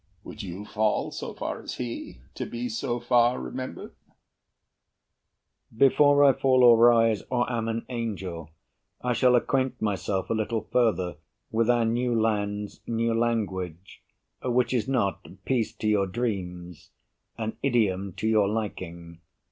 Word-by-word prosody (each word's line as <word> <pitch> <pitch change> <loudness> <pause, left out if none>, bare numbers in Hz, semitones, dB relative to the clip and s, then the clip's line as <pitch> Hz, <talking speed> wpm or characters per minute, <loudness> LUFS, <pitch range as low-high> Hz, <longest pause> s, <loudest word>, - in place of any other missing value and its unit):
Would - - -9
you 95 +4 -7
fall 105 0 0
So - - -6
far - - -4
as - - -6
he, 115 - -6
to - - -5
be 120 +1 -4
so 120 +2 -2
far 120 0 +3
remembered? 130 0 -6 1.8
BURR 110 - -19
Before 145 +1 +5
I 140 -1 +7
fall 130 0 +3
or 120 -1 +9
rise, 115 -2 +5
or 120 -1 +1
am 115 -1 -1
an 115 0 -3
angel, 95 - -5 0.5
I 125 0 +1
shall 125 +1 +4
acquaint 130 +1 0
myself 100 -2 -2
a - - +3
little 110 0 -1
further 95 -9 +1 0.3
With 115 +1 +1
our 120 -1 +3
new 120 +1 +1
land's 105 -2 -1
new 115 0 0
language, 95 -7 -2 0.4
which 125 0 +1
is 125 -1 0
not 120 -8 0 0.2
Peace 125 -4 0
to 110 - -3
your 105 -2 +2
dreams 90 -6 -4 0.5
an 110 -1 -4
idiom 100 -8 +1
to 110 - -3
your 105 -3 +3
liking. 85 -6 -5
115 Hz, 145 wpm, -26 LUFS, 100-120 Hz, 1.8 s, or